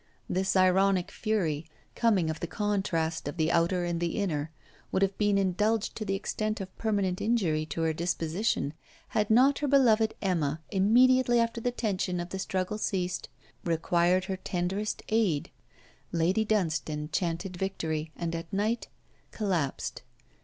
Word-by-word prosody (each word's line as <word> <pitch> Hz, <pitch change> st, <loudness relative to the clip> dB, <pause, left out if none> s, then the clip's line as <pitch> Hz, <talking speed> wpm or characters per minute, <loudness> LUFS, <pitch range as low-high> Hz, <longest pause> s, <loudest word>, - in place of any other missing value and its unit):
This 190 Hz, +2 st, 0 dB
ironic 185 Hz, 0 st, +3 dB
fury, 170 Hz, -9 st, -1 dB, 0.3 s
coming 195 Hz, -9 st, +2 dB
of 160 Hz, -, -6 dB
the 170 Hz, -, -3 dB
contrast 175 Hz, -6 st, -1 dB
of 145 Hz, -, -5 dB
the 160 Hz, 0 st, +2 dB
outer 170 Hz, +2 st, +2 dB
and 170 Hz, -1 st, -1 dB
the 170 Hz, -1 st, -1 dB
inner, 160 Hz, -7 st, -1 dB, 0.4 s
would 190 Hz, -, +2 dB
have 195 Hz, 0 st, +1 dB
been 205 Hz, -1 st, +3 dB
indulged 205 Hz, +3 st, +1 dB
to 215 Hz, -, -4 dB
the 195 Hz, -1 st, 0 dB
extent 215 Hz, +2 st, -2 dB
of 190 Hz, -1 st, -7 dB
permanent 200 Hz, -5 st, 0 dB
injury 175 Hz, -10 st, +1 dB
to 165 Hz, +2 st, -2 dB
her 160 Hz, -1 st, +1 dB
disposition 170 Hz, 0 st, -1 dB, 0.4 s
had 215 Hz, -3 st, 0 dB
not 260 Hz, +5 st, +5 dB
her 295 Hz, -, 0 dB
beloved 230 Hz, -6 st, +4 dB
Emma, 165 Hz, -6 st, 0 dB
immediately 240 Hz, +5 st, +4 dB
after 230 Hz, 0 st, 0 dB
the 245 Hz, -, +1 dB
tension 195 Hz, -6 st, -1 dB
of 175 Hz, 0 st, -4 dB
the 190 Hz, -, -5 dB
struggle 190 Hz, +2 st, -2 dB
ceased, 185 Hz, -4 st, -2 dB, 0.3 s
required 175 Hz, +2 st, +2 dB
her 190 Hz, -1 st, -3 dB
tenderest 190 Hz, +4 st, -2 dB
aid. 210 Hz, -10 st, +1 dB, 0.6 s
Lady 175 Hz, +6 st, +2 dB
Dunstane 155 Hz, -8 st, -1 dB
chanted 175 Hz, +2 st, -2 dB
victory, 160 Hz, -4 st, -3 dB
and 170 Hz, -1 st, -3 dB
at 165 Hz, +4 st, -6 dB
night 215 Hz, +4 st, 0 dB, 0.4 s
collapsed. 170 Hz, -, -2 dB
190 Hz, 150 wpm, -29 LUFS, 170-215 Hz, 0.6 s, not